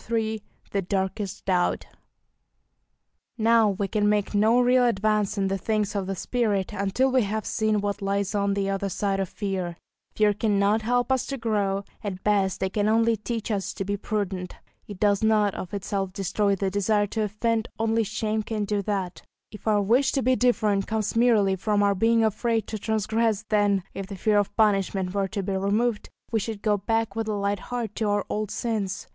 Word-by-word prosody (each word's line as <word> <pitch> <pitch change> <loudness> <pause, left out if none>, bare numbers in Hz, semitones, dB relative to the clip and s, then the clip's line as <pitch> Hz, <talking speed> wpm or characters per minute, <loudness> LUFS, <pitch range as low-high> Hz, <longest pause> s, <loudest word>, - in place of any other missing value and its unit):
III 220 -1 0 0.3
THE 200 - 0
DARKEST 195 +1 -3
DOUBT 180 -2 +1 1.5
Now 225 -1 +4
we 200 0 -1
can 210 0 +1
make 210 -1 0
no 220 +4 +4
real 250 +1 +4
advance 215 -2 +1
in 195 -1 +1
the 195 0 -1
things 210 +1 -1
of 195 -2 -2
the 195 - -2
spirit 210 -1 -1
until 205 +6 +1
we 255 0 +4
have 215 0 -2
seen 215 -2 0
what 205 0 -2
lies 200 +1 -1
on 200 -1 +1
the 200 -1 0
other 195 0 -1
side 195 +1 -1
of 190 -2 -1
fear; 185 -4 -3 0.4
fear 210 -1 +3
cannot 205 0 +2
help 245 +3 0
us 260 -2 +1
to 275 - -3
grow, 205 -4 0 0.2
at 190 -3 -5
best 195 -3 +1
it 190 - -2
can 210 0 +1
only 225 +1 +3
teach 225 +1 -4
us 200 -2 -2
to 195 - -3
be 200 +1 -1
prudent; 195 -3 -3 0.3
it 205 -3 -9
does 205 -2 +2
not 215 -2 +3
of 180 - -6
itself 195 -1 -3
destroy 200 +1 0
the 195 0 -2
desire 205 +1 +2
to 220 +2 -3
offend 220 +2 0
only 225 0 +1
shame 215 +1 -2
can 215 -1 -3
do 205 0 -1
that; 195 -3 -3 0.3
if 210 - -11
our 210 -2 +3
wish 250 +7 +3
to 270 - 0
be 255 +2 +3
different 215 -5 +2
comes 220 -1 -1
merely 220 -5 +4
from 205 +2 +1
our 200 0 +3
being 225 +3 +3
afraid 225 0 0
to 215 - -5
transgress, 220 0 0
then, 205 -3 +2
if 195 -1 -5
the 200 - -7
fear 210 +2 +2
of 205 - -2
punishment 195 -3 +1
were 200 -1 0
to 200 +1 -4
be 195 +1 -2
removed, 210 +4 0 0.2
we 225 - +2
should 215 0 -5
go 210 -1 +3
back 225 +3 -1
with 225 -1 -2
a 215 - -1
light 200 0 -1
heart 235 -2 -4
to 215 -2 -1
our 205 -1 0
old 215 -1 -2
sins. 210 -5 -3
210 Hz, 200 wpm, -25 LUFS, 195-220 Hz, 1.5 s, Now